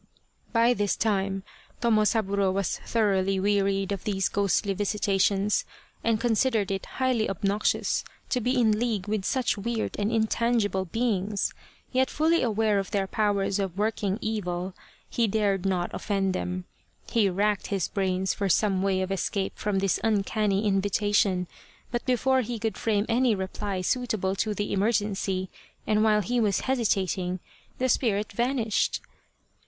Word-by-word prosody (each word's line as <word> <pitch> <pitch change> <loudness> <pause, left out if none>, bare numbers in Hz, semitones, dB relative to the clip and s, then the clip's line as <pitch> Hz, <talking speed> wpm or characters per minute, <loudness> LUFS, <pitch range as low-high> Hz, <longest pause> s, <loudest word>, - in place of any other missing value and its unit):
By 230 +1 +4
this 205 -4 0
time 195 -3 0 0.4
Tomosaburo 210 -4 +2
was 195 0 -1
thoroughly 195 -4 +1
wearied 195 0 +1
of 200 -3 -3
these 195 -2 0
ghostly 200 0 +1
visitations 200 0 +1 0.4
and 225 -2 +2
considered 225 -3 +1
it 195 -1 -3
highly 255 -4 +1
obnoxious 200 +2 0 0.3
to 250 - 0
be 250 +3 +1
in 215 -3 +3
league 225 -5 -1
with 210 -2 -1
such 255 -5 0
weird 230 +1 -2
and 205 +2 0
in 225 -1 +2
tangible 220 -4 0
beings, 205 0 -1 0.4
yet 260 +1 +2
fully 325 +3 +2
aware 215 -3 +2
of 195 - -4
their 200 -2 0
powers 200 -1 0
of 190 -2 -3
working 210 -2 0
evil, 185 -4 -2 0.3
he 235 -2 +1
dared 200 -2 +1
not 180 -2 -1
offend 195 -2 -1
them. 180 0 -3 0.5
He 215 -4 +3
racked 205 +2 0
his 195 -4 -1
brains 190 -1 0
for 200 -1 -2
some 195 0 +2
way 190 -1 +1
of 185 - -4
escape 195 0 -1
from 205 -2 -1
this 195 -1 +1
uncanny 210 -1 +1
invitation, 200 -1 +2 0.5
but 240 0 -2
before 260 +1 +3
he 240 0 -4
could 220 -2 -2
frame 210 -2 0
any 235 -1 +3
reply 190 0 -3
suit 245 +5 0
able 190 -1 -1
to 215 0 0
the 205 +1 -2
emergency, 195 -2 0 0.3
and 215 0 +2
while 215 -1 +4
he 245 +6 0
was 205 -4 +2
hesitating, 190 -7 0 0.4
the 260 - +1
spirit 215 -4 +1
vanished. 235 -1 0
205 Hz, 150 wpm, -27 LUFS, 195-225 Hz, 0.5 s, By